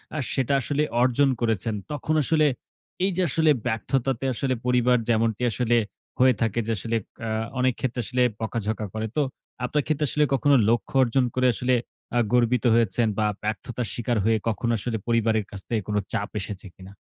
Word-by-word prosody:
আ -, -, -2 dB, 0.2 s
সেটা 135 Hz, 0 st, 0 dB
আসলে 145 Hz, +4 st, 0 dB, 0.2 s
অর্জন 130 Hz, +2 st, +3 dB
করেছেন। 115 Hz, -1 st, 0 dB, 0.2 s
তখন 150 Hz, +1 st, -2 dB
আসলে 155 Hz, +2 st, +3 dB, 0.6 s
এই 195 Hz, -, +1 dB
যে, -, -, +2 dB
আসলে 160 Hz, +1 st, +3 dB
ব্যর্থতাতে 125 Hz, +2 st, -1 dB
আসলে 130 Hz, +2 st, -1 dB
পরিবার 125 Hz, 0 st, +3 dB
যেমনটি 115 Hz, +1 st, +1 dB
আসলে 120 Hz, +3 st, +1 dB, 0.4 s
হয়ে 130 Hz, 0 st, +6 dB
থাকে 115 Hz, 0 st, +1 dB
যে, -, -, 0 dB
আসলে 115 Hz, +4 st, -2 dB, 0.3 s
আ -, -, -2 dB, 0.3 s
অনেক 130 Hz, -1 st, +3 dB
ক্ষেত্রে 125 Hz, -2 st, -2 dB
আসলে 125 Hz, +5 st, -1 dB, 0.2 s
বকাঝকা 110 Hz, -1 st, -2 dB
করে। 110 Hz, 0 st, -2 dB
তো -, -, +4 dB, 0.4 s
আপনার 150 Hz, +3 st, 0 dB
ক্ষেত্রে 155 Hz, -1 st, +1 dB
আসলে 150 Hz, -, +2 dB
কখনো 140 Hz, +2 st, +4 dB
লক্ষ্য 115 Hz, -1 st, 0 dB
অর্জন 125 Hz, +2 st, +2 dB
করে 130 Hz, 0 st, +3 dB
আসলে 125 Hz, +5 st, 0 dB, 0.4 s
আ -, -, +5 dB
গর্বিত 125 Hz, -1 st, +3 dB
হয়েছেন 115 Hz, 0 st, +2 dB
বা 110 Hz, -, +2 dB, 0.2 s
ব্যর্থতার 110 Hz, +3 st, -3 dB
শিকার 120 Hz, -1 st, -1 dB
হয়ে 110 Hz, 0 st, +3 dB
কখনো 115 Hz, +2 st, -1 dB
আসলে 115 Hz, +1 st, -2 dB
পরিবারের 110 Hz, -2 st, +2 dB
কাছ 100 Hz, -, -7 dB
থেকে 110 Hz, -3 st, 0 dB
কোন 105 Hz, -, -2 dB, 0.2 s
চাপ 100 Hz, -, -1 dB
এসেছে 100 Hz, 0 st, -6 dB
কিনা? 95 Hz, +1 st, -12 dB
120 Hz, 175 wpm, -25 LUFS, 110-130 Hz, 0.6 s, হয়ে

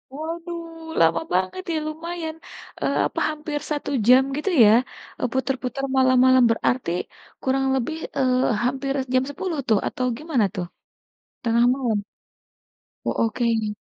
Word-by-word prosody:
Waduh, 330 Hz, 0 st, -6 dB
lama 165 Hz, -, +4 dB
banget 185 Hz, -, 0 dB
ya, -, -, 0 dB
lumayan, 320 Hz, 0 st, -5 dB, 0.5 s
eee, -, -, 0 dB
apa, -, -, -5 dB
hampir 300 Hz, -1 st, -4 dB
1 295 Hz, -1 st, -2 dB, 0.2 s
jam, 255 Hz, +2 st, +7 dB
gitu 345 Hz, +6 st, -1 dB
ya? 210 Hz, -, +7 dB, 0.5 s
Eee, 250 Hz, -, 0 dB
putar-putar, 265 Hz, 0 st, -2 dB
malam-malam. 260 Hz, 0 st, +5 dB
Berarti 235 Hz, -4 st, 0 dB, 0.5 s
kurang 270 Hz, 0 st, +1 dB
lebih, 265 Hz, +6 st, -2 dB, 0.2 s
eee, 255 Hz, -1 st, +2 dB, 0.2 s
hampir 270 Hz, +2 st, -1 dB, 0.2 s
jam 255 Hz, 0 st, +4 dB
10 325 Hz, +3 st, -4 dB
tuh, 215 Hz, -3 st, +4 dB
atau 255 Hz, -, -2 dB
gimana 290 Hz, -8 st, +1 dB
tuh? 180 Hz, -1 st, -2 dB, 0.8 s
Tengah 235 Hz, +1 st, +3 dB
malam? 240 Hz, -6 st, 0 dB, 1.1 s
Oh, -, -, +1 dB
oke. 225 Hz, -2 st, 0 dB
265 Hz, 130 wpm, -23 LUFS, 240-315 Hz, 1.1 s, jam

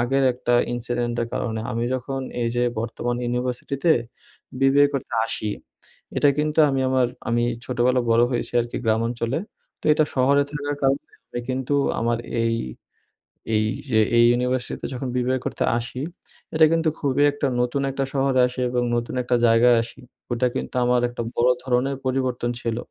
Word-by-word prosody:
আগের 135 Hz, +3 st, +2 dB
একটা 120 Hz, 0 st, 0 dB, 0.2 s
ইনসিডেন্টের 120 Hz, -1 st, -1 dB
কারণে। 110 Hz, -2 st, -2 dB
আমি 115 Hz, 0 st, -1 dB
যখন 135 Hz, +1 st, -3 dB, 0.2 s
এই 115 Hz, -, +1 dB
যে 120 Hz, -, +2 dB, 0.2 s
বর্তমান 120 Hz, +1 st, -3 dB
ইউনিভার্সিটিতে 125 Hz, +6 st, 0 dB, 0.7 s
বিবিএ 140 Hz, +1 st, +5 dB
করতে 140 Hz, -, -4 dB
আসি 110 Hz, -2 st, -2 dB, 0.7 s
এটা 145 Hz, -, +4 dB
কিন্তু 150 Hz, +1 st, 0 dB
আমি 135 Hz, -1 st, 0 dB
আমার 130 Hz, -1 st, +3 dB, 0.2 s
আমি 120 Hz, 0 st, +2 dB, 0.2 s
ছোটবেলায় 125 Hz, 0 st, +1 dB
বড় 115 Hz, +1 st, +5 dB
হয়েছি 120 Hz, -, -2 dB
আর 120 Hz, -, -2 dB
কি -, -, -5 dB
গ্রামাঞ্চলে 115 Hz, +3 st, 0 dB, 0.4 s
তো -, -, -23 dB
এটা 155 Hz, 0 st, +3 dB
শহরে 140 Hz, +2 st, +4 dB
থাকার 145 Hz, 0 st, -3 dB
কারণে 135 Hz, +1 st, +2 dB, 0.2 s
আমি 120 Hz, -, -4 dB
কিন্তু 130 Hz, +2 st, -1 dB, 0.3 s
আমার 115 Hz, 0 st, +1 dB, 0.2 s
এই 115 Hz, 0 st, +1 dB, 1.0 s
এই 110 Hz, 0 st, +2 dB, 0.2 s
যে 110 Hz, -3 st, +3 dB, 0.2 s
এই 120 Hz, -, +7 dB
ইউনিভার্সিটিতে 125 Hz, +1 st, -1 dB
যখন 130 Hz, +1 st, -4 dB
বিবিএ 125 Hz, +1 st, +1 dB
করতে -, -, -2 dB
আসি 125 Hz, +2 st, -5 dB, 0.5 s
এটা 160 Hz, 0 st, +6 dB
কিন্তু 165 Hz, -1 st, +2 dB
খুবই 140 Hz, 0 st, +1 dB
একটা 145 Hz, -1 st, -2 dB
নতুন 125 Hz, +3 st, 0 dB
একটা 135 Hz, 0 st, -2 dB
শহরে 135 Hz, -1 st, +2 dB
আসি 125 Hz, +1 st, -8 dB
এবং 125 Hz, 0 st, 0 dB
নতুন 120 Hz, +2 st, -2 dB
একটা 125 Hz, 0 st, +1 dB
জায়গায় 115 Hz, +1 st, +5 dB
আসি। 120 Hz, +3 st, -12 dB, 0.3 s
ওটা 125 Hz, +1 st, +2 dB
কিন্তু -, -, -4 dB
আমার 125 Hz, 0 st, +3 dB
একটা 120 Hz, -, -5 dB
বড় 120 Hz, +2 st, +3 dB
ধরনের 130 Hz, +1 st, 0 dB
পরিবর্তন 130 Hz, -2 st, -1 dB
ছিল 115 Hz, -1 st, -2 dB
125 Hz, 160 wpm, -23 LUFS, 120-135 Hz, 1.0 s, এই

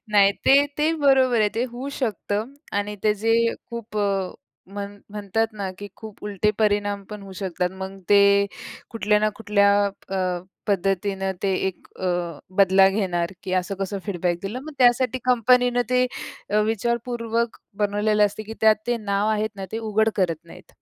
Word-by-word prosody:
नाही, 200 Hz, -1 st, +5 dB
ते, 270 Hz, -, +7 dB, 0.2 s
ते 310 Hz, +2 st, +3 dB
बरोबर 260 Hz, -4 st, +4 dB
आहे. 210 Hz, -, +4 dB
ते 235 Hz, -, +1 dB
होऊ 255 Hz, +3 st, -5 dB
शकतं 220 Hz, 0 st, -2 dB, 0.2 s
आणि 205 Hz, +1 st, -1 dB
ते 210 Hz, -, +5 dB
जे 225 Hz, 0 st, +3 dB, 0.4 s
खूप 230 Hz, -2 st, -7 dB
अ, 195 Hz, -2 st, 0 dB, 0.4 s
म्हण 200 Hz, +1 st, -7 dB
म्हणतात 210 Hz, +2 st, -1 dB
ना 200 Hz, -3 st, -4 dB
की 205 Hz, 0 st, -7 dB
खूप 220 Hz, -2 st, -11 dB
उलटे 210 Hz, 0 st, +1 dB
परिणाम 205 Hz, -1 st, +1 dB
पण 210 Hz, -1 st, -7 dB
होऊ 195 Hz, -1 st, -10 dB
शकतात. 180 Hz, -1 st, -1 dB
मग 195 Hz, +1 st, -6 dB
ते 205 Hz, -1 st, +7 dB, 0.7 s
कुठल्या 210 Hz, -2 st, +2 dB
ना -, -, +4 dB
कुठल्या 205 Hz, -2 st, +3 dB, 0.2 s
अ, 190 Hz, -2 st, -3 dB, 0.3 s
पद्धतीनं 195 Hz, 0 st, 0 dB
ते 195 Hz, -1 st, +1 dB
एक 190 Hz, -, -5 dB
अ, 175 Hz, -4 st, -2 dB, 0.2 s
बदला 190 Hz, 0 st, +6 dB
घेणार, 185 Hz, -3 st, -1 dB
की 185 Hz, -, -5 dB
असं 195 Hz, +2 st, -5 dB
कसं 195 Hz, +1 st, -2 dB
फीडबॅक 175 Hz, -3 st, -1 dB
दिलं. 215 Hz, +6 st, -4 dB
मग 310 Hz, -, -8 dB
त्यासाठी 250 Hz, 0 st, +4 dB
कंपनीनं 245 Hz, 0 st, +4 dB
ते 250 Hz, 0 st, +3 dB, 0.4 s
अ, 210 Hz, +1 st, +3 dB
विचारपूर्वक 235 Hz, +1 st, -1 dB, 0.3 s
बनवलेलं 210 Hz, +1 st, +2 dB
असते 210 Hz, +2 st, -6 dB
की 225 Hz, -, -5 dB
त्यात 220 Hz, -1 st, +6 dB
ते 240 Hz, 0 st, +1 dB
नाव 200 Hz, +1 st, +1 dB
आहेत 215 Hz, 0 st, 0 dB
ना, 195 Hz, -, -5 dB
ते 225 Hz, -, -2 dB
उघड 220 Hz, +1 st, +3 dB
करत 170 Hz, -3 st, 0 dB
नाहीत. 165 Hz, -, -15 dB
205 Hz, 165 wpm, -23 LUFS, 195-225 Hz, 0.7 s, ते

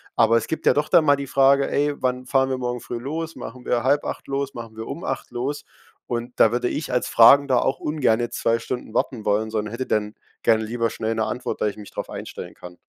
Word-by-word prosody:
Aber 115 Hz, 0 st, +4 dB
es 115 Hz, -, -2 dB
gibt 160 Hz, -, -4 dB
ja -, -, +6 dB
doch 150 Hz, +1 st, 0 dB
dann 160 Hz, -, +5 dB
mal 145 Hz, -1 st, +5 dB
die 140 Hz, -1 st, -6 dB
Frage: 140 Hz, +1 st, +4 dB
„Ey, 145 Hz, +1 st, +1 dB
wann 125 Hz, 0 st, -1 dB
fahren 135 Hz, +1 st, +2 dB
wir 130 Hz, -, -1 dB
morgen 125 Hz, -1 st, -3 dB
früh 120 Hz, -, -6 dB
los? 160 Hz, +5 st, -4 dB
Machen 125 Hz, +2 st, -9 dB
wir 120 Hz, -1 st, 0 dB
7:30 145 Hz, +2 st, 0 dB
los? 140 Hz, -1 st, -3 dB
Machen 115 Hz, -2 st, -8 dB
wir 110 Hz, 0 st, -7 dB
um -, -, -6 dB
8 -, -, -4 dB
los?“ 135 Hz, +5 st, -3 dB, 0.4 s
Und 120 Hz, +1 st, -4 dB
da 110 Hz, -, +6 dB
würde 125 Hz, +1 st, 0 dB
ich 155 Hz, -, -4 dB
als 125 Hz, -, 0 dB
Fragender 130 Hz, +2 st, +6 dB
auch 135 Hz, -, 0 dB
ungerne 120 Hz, -6 st, +1 dB
2 115 Hz, 0 st, +1 dB
Stunden 125 Hz, +2 st, -5 dB
warten 115 Hz, -5 st, -1 dB
wollen, 105 Hz, +1 st, +1 dB
sondern 105 Hz, -1 st, -2 dB
hätte 130 Hz, +3 st, -3 dB
denn, 105 Hz, -2 st, -1 dB, 0.3 s
gerne 110 Hz, -1 st, +3 dB
lieber 115 Hz, +1 st, -1 dB
schnell 110 Hz, +1 st, -2 dB
'ne 110 Hz, -, 0 dB
Antwort, 125 Hz, -, -4 dB
da -, -, +2 dB
ich 105 Hz, -, -4 dB
mich 105 Hz, -, -11 dB
drauf -, -, -5 dB
einstellen -, -, -8 dB
kann. 90 Hz, 0 st, -12 dB
125 Hz, 235 wpm, -23 LUFS, 115-135 Hz, 0.4 s, ja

